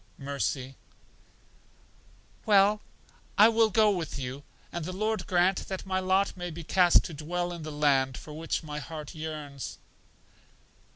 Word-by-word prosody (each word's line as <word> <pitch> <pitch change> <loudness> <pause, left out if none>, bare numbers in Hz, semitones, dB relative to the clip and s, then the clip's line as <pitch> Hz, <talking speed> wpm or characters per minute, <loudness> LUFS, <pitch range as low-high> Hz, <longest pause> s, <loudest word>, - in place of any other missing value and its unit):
Mercy: 135 -1 -3 1.7
Well, 205 0 +5 0.6
I 210 +2 +8
will 225 -1 +4
go 215 0 +4
with 170 -7 -3
you, 130 +1 -5 0.3
and 170 - -4
the 180 - -4
Lord 215 0 -1
grant 185 0 +2
that 190 -1 -5
my 185 -1 0
lot 190 +1 +1
may 180 -1 -5
be 170 0 -7
cast 180 +1 +5
to 170 - -6
dwell 175 +4 -3
in 170 - -7
the 155 0 -6
land 135 -3 +2
for 150 - -10
which 160 +2 -3
my 150 -1 -5
heart 155 -1 -7
yearns. 155 -3 -6
170 Hz, 150 wpm, -29 LUFS, 150-190 Hz, 1.7 s, I